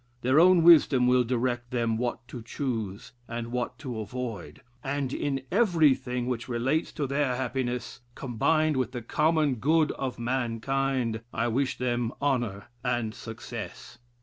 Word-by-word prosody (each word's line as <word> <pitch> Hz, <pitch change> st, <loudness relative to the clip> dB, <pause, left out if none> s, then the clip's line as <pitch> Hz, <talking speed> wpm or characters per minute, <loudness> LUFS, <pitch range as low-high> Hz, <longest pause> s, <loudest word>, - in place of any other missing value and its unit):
Their 130 Hz, +4 st, +4 dB
own 180 Hz, 0 st, +6 dB
wisdom 150 Hz, -6 st, +7 dB
will 125 Hz, 0 st, +4 dB
direct 120 Hz, 0 st, -1 dB
them 115 Hz, -2 st, 0 dB
what 120 Hz, +1 st, -3 dB
to 120 Hz, -, -7 dB
choose 110 Hz, -5 st, -4 dB, 0.2 s
and 115 Hz, 0 st, -5 dB
what 125 Hz, 0 st, -2 dB
to 125 Hz, -5 st, -5 dB
avoid, 115 Hz, -2 st, -6 dB, 0.2 s
and 140 Hz, -1 st, -2 dB
in 135 Hz, -2 st, -2 dB
everything 145 Hz, -, +2 dB
which 120 Hz, -2 st, -3 dB
relates 130 Hz, +7 st, 0 dB
to 150 Hz, -, -2 dB
their 140 Hz, -1 st, 0 dB
happiness, 125 Hz, -1 st, -3 dB, 0.2 s
combined 155 Hz, +5 st, +1 dB
with 130 Hz, -1 st, -1 dB
the 120 Hz, -3 st, -5 dB
common 155 Hz, 0 st, +2 dB
good 155 Hz, +6 st, +3 dB
of 130 Hz, -2 st, -4 dB
mankind, 120 Hz, 0 st, -1 dB
I 115 Hz, +1 st, 0 dB
wish 130 Hz, +3 st, 0 dB
them 120 Hz, -2 st, -1 dB
honor 120 Hz, -8 st, -1 dB, 0.2 s
and 120 Hz, -3 st, -1 dB
success." 115 Hz, +1 st, -8 dB
125 Hz, 145 wpm, -28 LUFS, 120-140 Hz, 0.2 s, wisdom